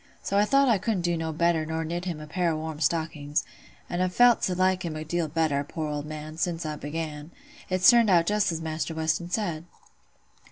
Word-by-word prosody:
So 200 - -2
I 205 - +4
thought 275 +4 +4
I 225 -5 +3
couldn't 210 -1 -1
do 165 -2 -1
better 165 0 +1
nor 160 +1 -3
knit 175 +3 -4
him 170 -4 -3
a 155 - -8
pair 175 +3 0
o' - - -2
warm 155 -1 -5
stockings; 155 -2 -1 0.4
an' 175 - -2
I've 185 0 -1
felt 245 -1 +6
to 180 - 0
like 185 0 +2
him 165 -3 -4
a 155 0 -5
deal 170 +1 -1
better, 150 -2 0
poor 155 +2 -5
old 145 0 -4
man, 155 +1 -7
sin' 165 0 -1
I 155 -1 -3
began. 150 0 -5 0.4
It's 185 -1 +3
turned 235 -3 +4
out 170 -3 +5
just 210 0 +1
as 165 -1 -4
Maister 160 0 -3
Weston 160 +2 -1
said." 175 -6 -2
165 Hz, 215 wpm, -26 LUFS, 155-185 Hz, 0.4 s, felt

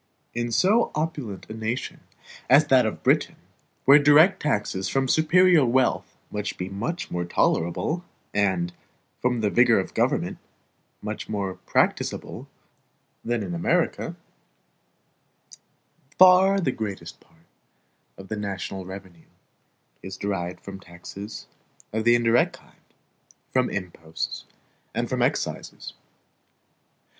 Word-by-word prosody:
In 120 0 -2
so 205 - +3
opulent 150 - -4
a - - -7
nation 110 +3 -4 0.5
as - - +7
that - - +5
of - - -5
Britain, - - +2 0.5
where 140 +2 +8
direct 155 +6 +5
taxes 105 -8 -1
from 135 +6 0
superior 165 +3 +5
wealth 130 +1 +1
must 105 0 -4
be 90 +1 -4
much 115 - -4
more 90 0 -1
tolerable, 85 - 0 0.3
and, 95 -4 +1 0.5
from 125 -2 +1
the 105 -2 +1
vigor 120 -3 +5
of 95 - -3
the - - -23
government, - - 0 0.6
much 105 -1 -5
more 100 -3 -2
practicable, - - -1 0.8
than 120 -2 -1
in 90 -3 -5
America, 85 - 0 2.0
far 185 +2 +7
the 150 -8 0
greatest 105 -5 -6
part 80 0 -27 0.7
of 95 - -11
the 110 - -4
national 95 -2 -5
revenue 95 -3 -11 0.7
is 95 0 -8
derived 90 -3 -3
from 100 -1 -9
taxes 95 +4 -9 0.5
of 110 0 -1
the 120 0 +6
indirect 120 0 +3
kind, - - -24 0.7
from 130 -1 +2
imposts, 85 -4 -5 0.5
and - - -1
from - - -2
excises. - - -2
110 Hz, 120 wpm, -25 LUFS, 95-135 Hz, 2.0 s, where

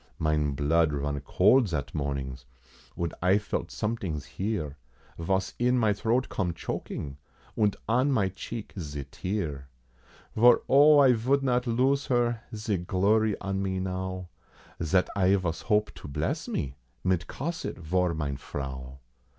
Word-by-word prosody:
Mine 75 -2 +1
blood 75 +3 +2
run 70 0 -2
cold 105 - +4
zat 75 -5 -3
mornings, 70 -3 -3 0.5
und 85 -1 -2
I 90 +3 +4
felt 105 0 -3
somedings 95 -10 -3
here, 80 -1 -3 0.4
Vos 95 +3 0
in 125 +1 +3
my 110 -4 +3
throat 115 +5 0
come 90 -4 -1
choking, 70 -4 -5 0.4
und 105 -2 +2
on 125 +5 +3
my 105 -8 +2
cheek 110 +4 -7
ze 75 -4 -5
tear, 75 -2 -4 0.7
Vor 120 +2 +6
O 145 +2 +7
I 135 -3 +7
vould 130 +5 +1
not 125 -1 +1
lose 130 +4 +2
her, 120 -2 +1
ze 105 -2 -1
glory 100 +4 +2
on 95 0 -2
me 95 -1 -1
now, 95 0 -3 0.5
Zat 90 +3 +2
I 95 0 +4
vos 90 -4 -2
hope 105 -1 +1
to - - -10
bless 70 - -2
me, 65 -1 -3 0.3
mit 90 -2 +1
Cosette 170 +5 -4
vor 90 +1 0
mine 70 -3 -2
Frau. 65 -2 -6
95 Hz, 145 wpm, -28 LUFS, 75-115 Hz, 0.7 s, O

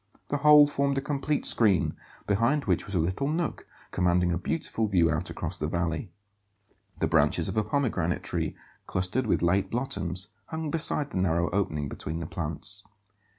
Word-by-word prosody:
The 145 - +1
whole 150 0 +8
formed 140 -1 0
a - - +3
complete 145 +1 -1
screen, 100 -9 +2 0.3
behind 120 +8 +2
which - - 0
was 100 - -4
a - - +3
little 90 +12 0
nook 160 +2 -2 0.2
commanding 90 -1 +2
a 85 - +1
beautiful 110 - -1
view 85 -5 +3
out 75 0 -1
across - - -4
the 75 - -1
valley. 85 +3 -2 0.9
The - - +2
branches - - +2
of - - -3
a 110 - +2
pomegranate 110 - 0
tree, - - -2 0.3
clustered 95 +7 -1
with 100 - +1
late 95 +3 +2
blossoms, 95 -8 -3 0.2
hung 160 -2 -4
beside 150 -2 0
the - - -3
narrow 85 -2 +1
opening 80 -7 -1
between 80 +4 -5
the 85 - -4
plants. 85 +6 -3
100 Hz, 170 wpm, -28 LUFS, 85-140 Hz, 0.9 s, whole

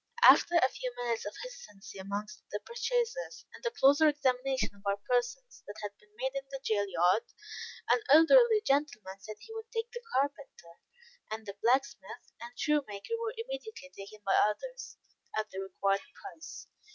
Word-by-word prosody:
After 345 - +7
a 335 -6 +6
few 255 -1 -5
minutes 240 -3 -2
of 205 - -5
hesitancy 485 - -10
amongst 205 +2 -5
the 205 - -2
purchasers, 480 +1 -2
and - - -13
a 475 - +1
closer 310 -7 +5
examination 265 -2 +1
of 200 - -19
our 200 0 0
persons 250 - -1
than 205 - -7
had 205 - -3
been 210 - -25
made 260 +2 -1
in 275 - -2
the 270 -1 -5
jail 205 -4 +1
yard, 180 +4 +3 0.7
an - - +4
elderly 435 - +7
gentleman 245 -9 0
said 215 +2 -8
he 445 - -11
would 450 0 -8
take 455 0 -3
the 480 - -7
carpenter; 270 -11 -3 0.5
and 220 0 -5
the 200 - -6
blacksmith, 255 -4 0
and 240 +1 -9
shoemaker, 285 - -1
were 460 0 -3
immediately 455 - -7
taken 200 +2 -10
by 195 - +2
others, - - -3 0.4
at 215 0 -2
the 190 - -5
required 195 +1 0 0.2
price. 390 -5 -9
265 Hz, 165 wpm, -31 LUFS, -, 0.7 s, After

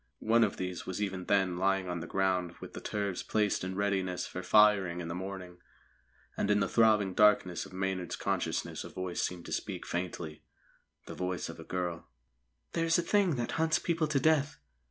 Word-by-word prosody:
One 115 +1 +3
of 105 - 0
these 90 -1 -4
was 95 +1 -3
even 95 -3 -2
then 95 -3 +2
lying 95 0 +1
on 90 -1 -3
the 85 - -6
ground 90 -2 0
with - - -9
the - - -7
turves 100 -3 -2
placed 105 -4 0
in 95 0 -3
readiness 95 -2 0
for 90 - -6
firing 100 -4 +4
in 85 -1 -5
the - - -3
morning, 90 -1 -6 0.8
and 100 - -1
in 105 0 +4
the 100 - +1
throbbing 105 -4 +4
darkness 95 -3 +3
of - - -17
Maynard's 95 -2 -2
consciousness - - -2
a - - -8
voice 95 -1 -3
seemed 90 -1 -3
to - - -5
speak - - -4
faintly 85 -3 -4 0.6
the - - -7
voice 90 0 -3
of - - -9
a - - -7
girl: 90 -2 -3 0.7
"_There's 165 0 +2
a 175 - +1
Thing 190 -3 +2
that 120 -2 -2
hunts 160 0 +3
people 165 -2 0
to 150 -2 +1
death. 155 0 +2
95 Hz, 195 wpm, -31 LUFS, 90-105 Hz, 0.8 s, firing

